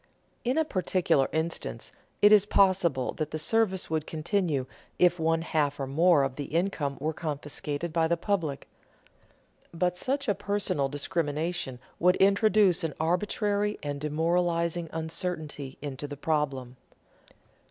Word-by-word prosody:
In 250 Hz, +4 st, 0 dB
a 320 Hz, -, +3 dB
particular 185 Hz, -, +1 dB
instance 160 Hz, +1 st, -3 dB, 0.3 s
it 205 Hz, -, +8 dB
is 205 Hz, -1 st, +6 dB
possible 185 Hz, -10 st, +2 dB
that 155 Hz, -2 st, -2 dB
the 155 Hz, -, -4 dB
service 190 Hz, +3 st, +1 dB
would 155 Hz, -1 st, -2 dB
continue 160 Hz, -4 st, -1 dB, 0.3 s
if 175 Hz, -1 st, +4 dB
one 165 Hz, 0 st, +1 dB
half 150 Hz, -4 st, 0 dB
or 135 Hz, -, -1 dB
more 155 Hz, +2 st, +4 dB
of 130 Hz, -1 st, -3 dB
the 145 Hz, -, -3 dB
income 160 Hz, -4 st, -1 dB
were 155 Hz, +3 st, -1 dB
confiscated 150 Hz, +1 st, -4 dB
by 165 Hz, -1 st, +2 dB
the 170 Hz, +1 st, +1 dB
public; 165 Hz, -7 st, -2 dB, 1.0 s
but 180 Hz, +1 st, 0 dB
such 275 Hz, +7 st, -1 dB
a 205 Hz, -, +3 dB
personal 200 Hz, -8 st, -1 dB
discrimination 155 Hz, -1 st, -2 dB, 0.2 s
would 180 Hz, +2 st, +4 dB
introduce 200 Hz, -2 st, +4 dB
an 160 Hz, -3 st, -2 dB
arbitrary 205 Hz, +5 st, 0 dB
and 145 Hz, -1 st, -4 dB
demoralizing 170 Hz, +2 st, 0 dB
uncertainty 160 Hz, -4 st, -4 dB
into 145 Hz, 0 st, -5 dB
the 145 Hz, 0 st, -7 dB
problem. 140 Hz, -5 st, -2 dB
165 Hz, 135 wpm, -28 LUFS, 145-185 Hz, 1.0 s, it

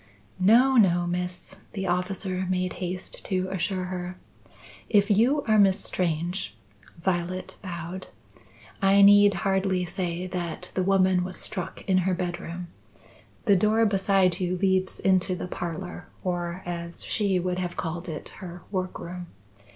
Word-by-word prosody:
"No, 245 Hz, +8 st, +5 dB
no, 175 Hz, -5 st, +4 dB
Miss," 180 Hz, 0 st, -4 dB, 0.2 s
the 195 Hz, -2 st, -3 dB
officer 185 Hz, +1 st, -1 dB
made 185 Hz, -1 st, 0 dB
haste 180 Hz, 0 st, -4 dB
to 185 Hz, -1 st, -1 dB
assure 185 Hz, 0 st, -1 dB
her. 180 Hz, 0 st, -5 dB, 0.7 s
"If 205 Hz, 0 st, +4 dB
you 250 Hz, +8 st, +3 dB
are 215 Hz, -1 st, +3 dB
Miss 195 Hz, 0 st, +5 dB
Strange" 175 Hz, 0 st, -2 dB, 0.4 s
(Violet 180 Hz, +1 st, -2 dB
bowed), 180 Hz, 0 st, -6 dB, 0.7 s
"I 195 Hz, +1 st, +6 dB
need 205 Hz, 0 st, +7 dB
hardly 190 Hz, -1 st, +1 dB
say 175 Hz, -1 st, -3 dB
that 180 Hz, -1 st, -4 dB
the 185 Hz, -, 0 dB
woman 185 Hz, -1 st, +3 dB
was 185 Hz, +1 st, -5 dB
struck 185 Hz, -5 st, -4 dB
in 185 Hz, -1 st, +4 dB
her 185 Hz, 0 st, +1 dB
bedroom. 175 Hz, -1 st, -4 dB, 0.8 s
The 200 Hz, -4 st, +5 dB
door 215 Hz, +4 st, +3 dB
beside 195 Hz, -3 st, +2 dB
you 180 Hz, 0 st, -1 dB
leads 190 Hz, 0 st, +1 dB
into 185 Hz, -1 st, +2 dB
the 180 Hz, -, -5 dB
parlour, 175 Hz, +1 st, -5 dB, 0.2 s
or 175 Hz, 0 st, -2 dB
as 170 Hz, -1 st, -5 dB
she 200 Hz, -3 st, +1 dB
would 180 Hz, 0 st, -1 dB
have 180 Hz, -1 st, -3 dB
called 170 Hz, +1 st, -4 dB
it, 155 Hz, -2 st, -6 dB
her 175 Hz, -2 st, -8 dB
work 185 Hz, -2 st, -2 dB
room. 175 Hz, 0 st, -7 dB
185 Hz, 145 wpm, -26 LUFS, 175-195 Hz, 0.8 s, need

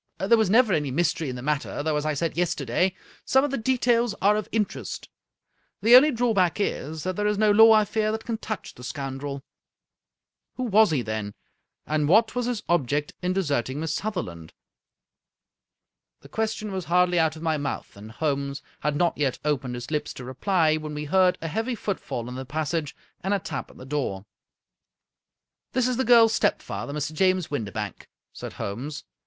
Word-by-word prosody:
There 195 Hz, +5 st, +4 dB
was 220 Hz, -4 st, +2 dB
never 225 Hz, -1 st, +5 dB
any 150 Hz, -4 st, 0 dB
mystery 160 Hz, +1 st, 0 dB
in 125 Hz, -, -4 dB
the 125 Hz, -, -7 dB
matter, 145 Hz, 0 st, -2 dB
though, 155 Hz, 0 st, 0 dB
as 150 Hz, +1 st, -1 dB
I 155 Hz, -, 0 dB
said 165 Hz, +3 st, -2 dB
yesterday, 175 Hz, +1 st, 0 dB, 0.3 s
some 265 Hz, 0 st, +3 dB
of 290 Hz, -, -1 dB
the 275 Hz, -, -1 dB
details 240 Hz, -2 st, +2 dB
are 205 Hz, +2 st, +4 dB
of 215 Hz, -1 st, -3 dB
in 220 Hz, -2 st, +2 dB
terest. -, -, -8 dB, 0.7 s
The 235 Hz, +3 st, +8 dB
only 280 Hz, +5 st, +8 dB
drawback 225 Hz, -, +1 dB
is 155 Hz, -6 st, -2 dB
that 185 Hz, 0 st, -2 dB
there 210 Hz, +2 st, 0 dB
is 210 Hz, -1 st, +1 dB
no 215 Hz, 0 st, +4 dB
law, 225 Hz, +2 st, +8 dB
I 215 Hz, -1 st, +5 dB
fear, 215 Hz, +1 st, 0 dB
that 220 Hz, 0 st, -4 dB
can 225 Hz, -2 st, -3 dB
touch 215 Hz, -3 st, -5 dB
the 125 Hz, -, -13 dB
scoundrel." 135 Hz, 0 st, -5 dB, 0.6 s
" -, -, -63 dB
Who 255 Hz, -, -2 dB
was 220 Hz, -3 st, +5 dB
he, 145 Hz, -6 st, 0 dB
then, 110 Hz, -2 st, -4 dB, 0.5 s
and 150 Hz, -1 st, 0 dB
what 220 Hz, +7 st, +4 dB
was 245 Hz, -1 st, -1 dB
his 240 Hz, -4 st, -2 dB
object 145 Hz, -3 st, 0 dB
in 180 Hz, 0 st, 0 dB
desert 145 Hz, -11 st, 0 dB
ing 135 Hz, +3 st, -4 dB
Miss 160 Hz, -1 st, -2 dB
Sutherland?" 120 Hz, -, -4 dB, 1.7 s
The -, -, -15 dB
question 220 Hz, -1 st, -2 dB
was 190 Hz, -3 st, -4 dB
hardly 180 Hz, +1 st, +3 dB
out 160 Hz, -1 st, +2 dB
of 160 Hz, -, -10 dB
my 160 Hz, -2 st, +1 dB
mouth, 145 Hz, -1 st, -4 dB
and 105 Hz, +2 st, -11 dB
Holmes 140 Hz, +1 st, -2 dB, 0.2 s
had 150 Hz, 0 st, -1 dB
not 170 Hz, +2 st, +2 dB
yet 135 Hz, -4 st, +1 dB
opened 135 Hz, -4 st, -1 dB
his 120 Hz, +3 st, -7 dB
lips 150 Hz, -1 st, -2 dB
to 125 Hz, -, -8 dB
reply, 155 Hz, +4 st, +1 dB
when 155 Hz, -1 st, -6 dB
we 150 Hz, 0 st, -4 dB
heard 185 Hz, +3 st, +3 dB
a -, -, -2 dB
heavy 225 Hz, +9 st, -2 dB
footfall 190 Hz, -, -4 dB
in 125 Hz, -, -6 dB
the 130 Hz, +1 st, -5 dB
passage, 155 Hz, +2 st, -3 dB, 0.3 s
and 195 Hz, +2 st, +1 dB
a -, -, 0 dB
tap 155 Hz, -3 st, -5 dB
at -, -, -17 dB
the 130 Hz, -, -10 dB
door. 130 Hz, -9 st, -3 dB, 1.5 s
"This 255 Hz, -1 st, +2 dB
is 250 Hz, -2 st, -1 dB
the 260 Hz, -, +1 dB
girl's 230 Hz, -2 st, +6 dB
stepfather, 140 Hz, -, -1 dB
Mr. 150 Hz, +1 st, -3 dB
James 185 Hz, 0 st, +1 dB
Windibank," 105 Hz, -6 st, -4 dB, 0.3 s
said -, -, -7 dB
Holmes. 130 Hz, +10 st, -5 dB
165 Hz, 195 wpm, -25 LUFS, 140-215 Hz, 1.7 s, The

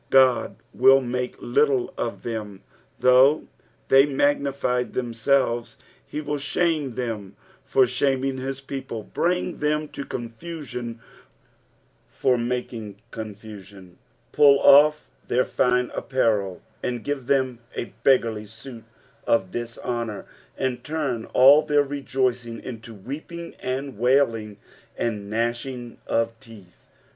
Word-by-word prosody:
God 130 Hz, -2 st, +4 dB, 0.2 s
will 135 Hz, +1 st, +6 dB
make 125 Hz, -1 st, -3 dB
little 130 Hz, 0 st, +1 dB
of 120 Hz, -, -4 dB
them, 105 Hz, -4 st, -5 dB, 0.4 s
though 130 Hz, +4 st, +5 dB, 0.4 s
they 135 Hz, 0 st, +7 dB
" -, -, -6 dB
magnified 140 Hz, -3 st, 0 dB
them 120 Hz, -2 st, -2 dB
idBa 120 Hz, 0 st, +1 dB, 0.2 s
;" -, -, -34 dB
he 150 Hz, -, -4 dB
wilt 145 Hz, -1 st, -3 dB
shame 155 Hz, -3 st, 0 dB
them 110 Hz, -6 st, -4 dB, 0.3 s
for 130 Hz, -1 st, +4 dB
shaming 135 Hz, +1 st, 0 dB
his 135 Hz, +1 st, -4 dB
people, 135 Hz, -5 st, -6 dB
bring 180 Hz, +6 st, -1 dB
them 150 Hz, +1 st, 0 dB
to -, -, -6 dB
confusion 125 Hz, -2 st, -6 dB, 1.1 s
for 130 Hz, -, +1 dB
making 120 Hz, -3 st, -3 dB, 0.2 s
confusion, 100 Hz, -4 st, -10 dB, 0.3 s
pull 140 Hz, -2 st, +6 dB
off 150 Hz, +2 st, +6 dB, 0.2 s
their 125 Hz, +1 st, +2 dB
fine 125 Hz, 0 st, +1 dB
apparel 105 Hz, -8 st, 0 dB, 0.2 s
and 120 Hz, -2 st, -3 dB
give 140 Hz, -3 st, -3 dB
them 130 Hz, -3 st, +1 dB, 0.2 s
a 120 Hz, -, -5 dB
beggarly 115 Hz, -5 st, +2 dB
suit 115 Hz, +2 st, -11 dB, 0.4 s
of 95 Hz, -5 st, +2 dB
diijhonour, 120 Hz, -2 st, -4 dB, 0.3 s
and 125 Hz, -2 st, -2 dB
turn 140 Hz, -6 st, -2 dB
all 140 Hz, +4 st, +7 dB
their 145 Hz, -1 st, +2 dB
rejoicing 130 Hz, -4 st, -2 dB
into 115 Hz, -2 st, -8 dB
weeping 155 Hz, -, -7 dB
and 130 Hz, -2 st, -4 dB
wailing, 115 Hz, -5 st, +2 dB, 0.4 s
and 105 Hz, -3 st, -2 dB
gnashing 120 Hz, +2 st, -3 dB
of 115 Hz, 0 st, 0 dB
teeth. 110 Hz, -8 st, -16 dB
125 Hz, 120 wpm, -24 LUFS, 115-140 Hz, 1.1 s, they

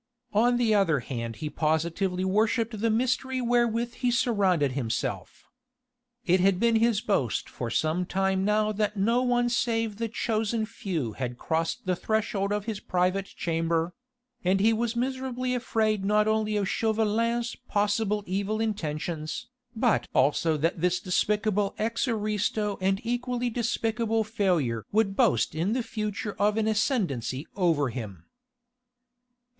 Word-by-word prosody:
On 240 Hz, +4 st, +4 dB
the 235 Hz, -3 st, +2 dB
other 170 Hz, -9 st, +3 dB
hand 115 Hz, -2 st, -5 dB
he -, -, -2 dB
positively 170 Hz, +5 st, 0 dB
worshipped 215 Hz, +2 st, +1 dB
the 230 Hz, -, +2 dB
mystery 255 Hz, +3 st, 0 dB
wherewith 240 Hz, -1 st, +1 dB
he 250 Hz, 0 st, -1 dB
surrounded 195 Hz, -, +2 dB
himself. 125 Hz, -4 st, -3 dB, 0.8 s
It 180 Hz, +2 st, +4 dB
had 185 Hz, 0 st, +3 dB
been 230 Hz, 0 st, +3 dB
his 225 Hz, -2 st, +2 dB
boast 140 Hz, -, 0 dB
for 120 Hz, -, -5 dB
some 160 Hz, +8 st, 0 dB
time 190 Hz, 0 st, +1 dB
now 210 Hz, +1 st, +2 dB
that 210 Hz, 0 st, -1 dB
no 230 Hz, +5 st, +2 dB
one 245 Hz, -1 st, +2 dB
save 230 Hz, -3 st, 0 dB
the 230 Hz, +1 st, -1 dB
chosen 220 Hz, 0 st, -1 dB
few 185 Hz, -, -4 dB
had 125 Hz, 0 st, -4 dB
crossed 165 Hz, +4 st, -2 dB
the 185 Hz, -1 st, +1 dB
threshold 210 Hz, 0 st, -1 dB
of 205 Hz, 0 st, -1 dB
his 220 Hz, -3 st, -3 dB
private 185 Hz, +2 st, 0 dB
chamber: 165 Hz, 0 st, -1 dB, 0.5 s
and 185 Hz, +2 st, +2 dB
he 220 Hz, +3 st, +4 dB
was 235 Hz, +1 st, -1 dB
miserably 255 Hz, 0 st, -2 dB
afraid 220 Hz, -4 st, 0 dB
not 210 Hz, +1 st, +3 dB
only 215 Hz, -1 st, +1 dB
of 200 Hz, -2 st, 0 dB
Chauvelin's 230 Hz, +3 st, 0 dB
possible 210 Hz, 0 st, +1 dB
evil 200 Hz, +3 st, -1 dB
intentions, 160 Hz, -7 st, -3 dB, 0.3 s
but 230 Hz, 0 st, +2 dB
also 150 Hz, +4 st, +3 dB
that 165 Hz, +2 st, -1 dB
this 180 Hz, +1 st, +2 dB
despicable 205 Hz, +2 st, 0 dB
ex 230 Hz, +4 st, -1 dB
aristo 210 Hz, -2 st, -1 dB
and 195 Hz, +1 st, +1 dB
equally 245 Hz, +1 st, -1 dB
despicable 225 Hz, -1 st, 0 dB
failure 180 Hz, -, 0 dB
would 205 Hz, -2 st, +2 dB
boast 115 Hz, -, +2 dB
in 170 Hz, +7 st, 0 dB
the 250 Hz, 0 st, 0 dB
future 210 Hz, -1 st, -4 dB
of 210 Hz, +1 st, +2 dB
an 220 Hz, -1 st, +1 dB
ascendancy 190 Hz, -, 0 dB
over 165 Hz, -8 st, +2 dB
him. 105 Hz, -9 st, -7 dB
210 Hz, 140 wpm, -27 LUFS, 180-225 Hz, 0.8 s, On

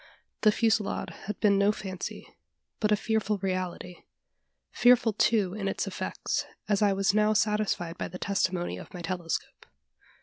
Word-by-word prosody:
The 215 Hz, -, +6 dB
fusillade 215 Hz, -2 st, 0 dB, 0.2 s
had 210 Hz, -, -4 dB
been 200 Hz, -2 st, +4 dB
no 200 Hz, +1 st, +4 dB
fancy, 190 Hz, -3 st, -6 dB, 0.5 s
but 210 Hz, -1 st, +1 dB
a -, -, +6 dB
fearful 215 Hz, -1 st, 0 dB
reality 185 Hz, -2 st, -3 dB, 0.7 s
fearful, 245 Hz, -2 st, +4 dB
too, 205 Hz, -3 st, +2 dB
in 200 Hz, -1 st, -3 dB
its 195 Hz, -, -1 dB
effects, -, -, -3 dB, 0.2 s
as 205 Hz, -1 st, +1 dB
I 205 Hz, -1 st, +4 dB
was 195 Hz, 0 st, +2 dB
now 215 Hz, 0 st, +3 dB
satisfied 210 Hz, -5 st, 0 dB
by -, -, -2 dB
the 180 Hz, -, -8 dB
testimony 185 Hz, -2 st, -1 dB
of -, -, -11 dB
my 175 Hz, -, -7 dB
telescope. 170 Hz, -1 st, -4 dB
200 Hz, 155 wpm, -28 LUFS, 185-215 Hz, 0.7 s, The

